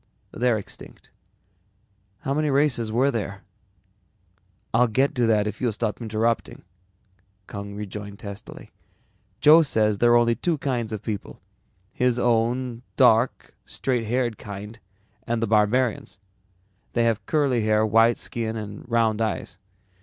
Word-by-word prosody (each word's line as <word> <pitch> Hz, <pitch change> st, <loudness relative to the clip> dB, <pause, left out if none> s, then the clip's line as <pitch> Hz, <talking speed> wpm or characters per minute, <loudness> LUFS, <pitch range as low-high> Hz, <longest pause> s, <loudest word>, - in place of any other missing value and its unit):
"They're 120 Hz, -1 st, +1 dB
extinct." 105 Hz, -, -11 dB, 1.1 s
"How 135 Hz, -, -2 dB
many 150 Hz, +1 st, 0 dB
races 135 Hz, -6 st, +1 dB
were 130 Hz, +5 st, +2 dB
there?" 100 Hz, -4 st, -4 dB, 1.3 s
"I'll 120 Hz, +2 st, +4 dB
get 130 Hz, +6 st, +1 dB
to 125 Hz, -4 st, +1 dB
that 105 Hz, -2 st, +3 dB
if 105 Hz, -1 st, -5 dB
you'll 120 Hz, -2 st, +1 dB
stop 110 Hz, +2 st, -3 dB
interrupting," 115 Hz, +1 st, -1 dB, 0.8 s
Kung 100 Hz, 0 st, -7 dB
rejoined 105 Hz, 0 st, -7 dB
testily. 100 Hz, -2 st, -10 dB, 0.7 s
"Joe 155 Hz, +2 st, +8 dB
says 110 Hz, -8 st, +1 dB
there 120 Hz, 0 st, +4 dB
are -, -, +7 dB
only 120 Hz, 0 st, +3 dB
two 160 Hz, +8 st, -1 dB
kinds 125 Hz, -5 st, -2 dB
of 110 Hz, -3 st, -5 dB
people, 105 Hz, -3 st, -5 dB, 0.5 s
his 125 Hz, -1 st, +1 dB
own 120 Hz, +1 st, 0 dB
dark, 120 Hz, -1 st, +3 dB
straight 125 Hz, -4 st, -2 dB
haired 120 Hz, -1 st, -1 dB
kind 105 Hz, +2 st, -8 dB, 0.5 s
and 120 Hz, -1 st, 0 dB
the 115 Hz, -, +1 dB
barbarians. 110 Hz, +2 st, +1 dB, 0.7 s
They 120 Hz, -, +2 dB
have 115 Hz, -2 st, +1 dB
curly 140 Hz, -6 st, +1 dB
hair, 110 Hz, 0 st, +3 dB
white 115 Hz, +2 st, +4 dB
skin 115 Hz, -1 st, -4 dB
and 105 Hz, -2 st, -7 dB
round 115 Hz, -2 st, +1 dB
eyes. 110 Hz, -2 st, -3 dB
115 Hz, 135 wpm, -24 LUFS, 105-125 Hz, 1.3 s, Joe